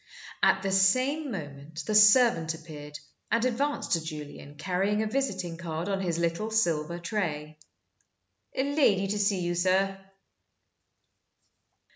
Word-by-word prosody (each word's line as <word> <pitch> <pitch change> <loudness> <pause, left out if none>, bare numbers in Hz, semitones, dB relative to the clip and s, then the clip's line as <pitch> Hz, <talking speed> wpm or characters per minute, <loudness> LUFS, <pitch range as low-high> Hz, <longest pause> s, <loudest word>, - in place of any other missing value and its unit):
At - - +3
the 195 - -1
same 255 +11 +2
moment 150 - -7
the 215 - -2
servant 210 -6 +5
appeared, 150 -2 -10 0.3
and 230 +1 +1
advanced 275 +4 -1
to 165 - +2
Julian, 150 -2 -8
carrying 190 +6 0
a - - -2
visiting 195 -9 -2
card 165 0 -4
on 195 -1 -1
his 170 -3 -1
little 170 +5 -1
silver 170 -7 0
tray. 155 -6 -4 1.0
"A 265 - +1
lady 275 -9 +2
to 205 +1 -1
see 195 -2 +1
you, 175 0 -1
sir." 190 +2 +1
185 Hz, 130 wpm, -28 LUFS, 160-215 Hz, 1.0 s, servant